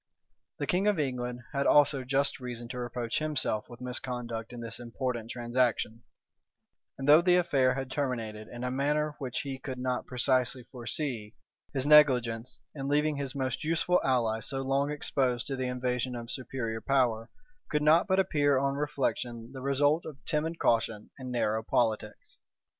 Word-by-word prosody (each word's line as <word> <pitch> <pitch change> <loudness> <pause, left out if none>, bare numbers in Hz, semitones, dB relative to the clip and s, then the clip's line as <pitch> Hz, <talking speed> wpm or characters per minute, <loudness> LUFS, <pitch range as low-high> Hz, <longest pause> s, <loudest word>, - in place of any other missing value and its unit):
The - - -2
king 195 +2 +1
of 205 -3 +3
England 125 -3 -2
had 140 0 +1
also 145 -2 +5
just 135 +2 0
reason 120 -2 -6
to 125 0 -5
reproach 120 -1 -2
himself 145 -8 0
with 120 - -11
misconduct 125 -2 -4
in 120 - -8
this 115 0 -6
important 120 -1 -4
transaction; 120 -2 0 1.0
and 135 - -4
though 150 +3 +8
the 180 0 +4
affair 140 -8 +3
had 135 -1 -4
terminated 115 -6 -3
in 120 0 -8
a 125 - -1
manner 150 +3 0
which 130 -3 -3
he 135 -2 -5
could 130 -1 -6
not 125 0 -2
precisely 130 0 +1
foresee, 120 -2 -4 0.4
his 135 -1 -1
negligence, 125 -6 +4
in 135 -2 -5
leaving 150 +1 +2
his 140 -1 -3
most 130 +4 -2
useful 165 +3 +2
ally 115 -4 +1
so 135 +3 -2
long 135 +2 +1
exposed 130 -4 0
to 140 - -2
the 130 -1 -2
invasion 125 0 -1
of 115 -1 -6
superior 120 -3 -4
power, 125 -4 +1 0.4
could 150 -1 0
not 160 +5 +5
but 190 -1 +2
appear 145 -6 +3
on 135 +1 +1
reflection 130 -5 -2
the 130 - -7
result 145 +4 +2
of 150 -4 -8
timid 160 +1 -1
caution 115 -5 0
and 130 -1 -6
narrow 110 -3 0
politics. 110 -1 -1
130 Hz, 165 wpm, -30 LUFS, 120-145 Hz, 1.0 s, though